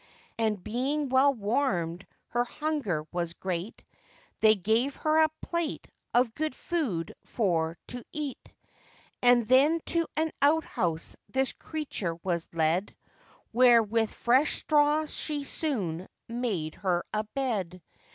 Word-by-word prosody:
And, 215 -4 0
being 270 +5 -1
well 265 +2 +5
warmed, 200 -7 -1 0.2
her 240 0 +1
hunger 245 - -2
was 170 -1 -3
great, 185 +2 -4 0.6
They 220 0 +6
gave 225 +8 +1
her 310 0 +1
a 315 - +5
plate 340 -3 -2 0.2
of 240 -1 +3
good 310 -1 -2
food 240 - -2
for 165 -6 0
to 245 -1 -5
eat, 295 -3 -5 0.7
And 245 -2 +5
then 280 +7 +5
to 335 -1 0
an 315 0 +1
outhouse 280 - +1
this 265 0 0
creature 275 - -4
was 170 -3 -2
led, 165 +4 0 0.6
Where 240 -1 +6
with 225 +1 0
fresh 260 +5 +3
straw 300 +1 +3
she 300 -1 -2
soon 195 - -3 0.2
made 225 -10 -2
her 180 -3 0
a 215 0 0
bed. 210 -8 -3
235 Hz, 125 wpm, -28 LUFS, 185-285 Hz, 0.7 s, They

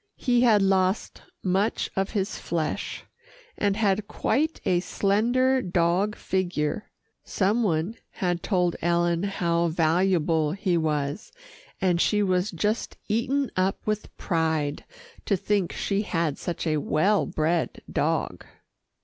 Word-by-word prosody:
He 245 -2 +2
had 220 -5 +5
lost 190 +1 +1 0.2
much 195 +3 0
of 195 0 0
his 200 0 -2
flesh, 165 -3 -3 0.5
and 200 -1 0
had 205 -2 +1
quite 310 +7 0
a 175 - +3
slender 240 +8 +2
dog 180 +3 +1
figure. 180 -1 -2 0.3
Some 205 +5 +1
one 180 +1 0
had 175 -2 -2
told 180 -4 +1
Ellen 170 0 +1
how 170 -4 0
valuable 165 -1 +2
he 190 -2 0
was, 150 +1 -1 0.5
and 180 -2 +2
she 210 -1 +2
was 185 +1 +1
just 210 +5 -2
eaten 255 +5 0
up 185 +1 +1
with 215 0 -3
pride 160 -4 -1 0.4
to 200 - +1
think 200 -1 0
that - - -8
she 200 0 0
had 165 -7 -1
such 175 - -4
a 155 -2 +1
well 190 +8 +2
bred 160 +2 -1
dog. - - -1
185 Hz, 130 wpm, -26 LUFS, 170-210 Hz, 0.5 s, had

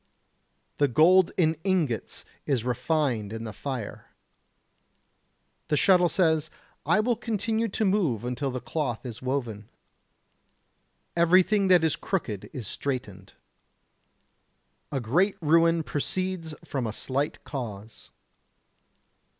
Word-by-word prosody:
The 145 - +4
gold 170 +8 +5
in 160 -3 +3
ingots 165 - -1 0.2
is 130 -6 +1
refined 125 -3 0
in 115 0 -5
the 110 -2 -6
fire. 120 0 -6 1.6
The 150 -2 +1
shuttle 180 0 +5
says: 160 -4 +2 0.4
I 215 - +4
will 235 +2 +2
continue 225 0 -1
to 215 +1 -1
move 170 - +1
until 125 +3 -2
the 125 0 -4
cloth 130 -3 -3
is 120 -4 -7
woven. 120 -6 -3 1.5
Everything 185 +4 +4
that 180 -3 +5
is 160 -3 +2
crooked 115 - -3
is 125 -5 -6
straightened. 100 -9 -5 1.7
Great 175 - +2
ruin 165 +1 +3
proceeds 165 +2 -3
from 130 -4 -2
a 110 - -4
slight 135 +6 -2
cause. 110 -6 -7
150 Hz, 110 wpm, -27 LUFS, 120-180 Hz, 1.7 s, gold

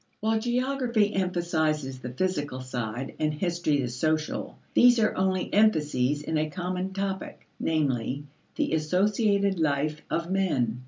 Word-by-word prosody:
While 220 +1 +1
geography 240 -3 +1
emphasizes 160 -7 0
the 125 - -6
physical 145 -2 -2
side 125 0 -4
and 155 0 +1
history 170 -4 0
the 125 - -1
social, 155 +6 -1 0.2
these 245 0 +6
are 215 - +2
only 185 -1 0
emphases 150 -9 +2
in 160 0 0
a 155 0 0
common 180 +2 -3
topic, 195 -1 -4
namely, 140 -3 0 0.3
the - - 0
associated 200 +4 +2
life 150 0 0
of 170 +2 -2
men. 135 -12 +1
165 Hz, 130 wpm, -27 LUFS, 145-195 Hz, 0.3 s, these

